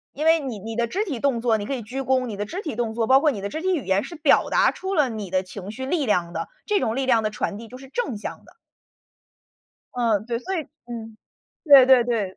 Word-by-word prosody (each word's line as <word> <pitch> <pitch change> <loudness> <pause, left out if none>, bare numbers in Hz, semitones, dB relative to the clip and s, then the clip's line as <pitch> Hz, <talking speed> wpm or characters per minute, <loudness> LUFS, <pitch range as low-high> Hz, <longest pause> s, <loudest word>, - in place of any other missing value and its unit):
因 295 - -3
为 325 0 +6
你 260 -9 -5
你 225 +3 -6
的 235 0 +1
肢 390 - -2
体 300 - -4
动 265 -2 0
作， 230 -1 +2
你 205 - -5
可 275 - -2
以 250 - -5
鞠 250 +5 -5
躬 260 -1 +1
你 220 -4 -5
的 205 +1 -3
肢 365 - -5
体 305 - -5
动 230 -2 -2
作， 225 -1 -1
包 265 - +7
括 295 +1 +2
你 205 - -6
的 200 - -3
肢 315 - -5
体 375 0 +1
语 285 - -4
言， 190 +2 +1
是 - - -8
表 300 -2 +3
达 - - +4
出 380 +1 -4
了 300 -6 +3
你 215 -4 -5
的 185 +1 0
情 195 +1 -8
绪 260 +4 -6
力 295 0 0
量 175 -5 +1
的。 - - -4 0.2
这 420 -1 +2
种 225 - -1
力 270 +2 -1
量 235 -4 +3
的 215 - 0
传 210 -1 -3
递 230 - -9
就 255 +3 -11
是 270 0 -13
正 275 - -3
向 205 - -7
的。 - - -19 1.4
嗯， 225 -4 +1
对， 235 -1 -2
所 380 +7 -3
以 315 - -5 0.2
嗯， 225 -2 -8 0.5
对 280 -5 +8
对 260 -2 +7
对。 215 -6 -2
240 Hz, 290 characters per minute, -23 LUFS, 215-280 Hz, 1.4 s, 对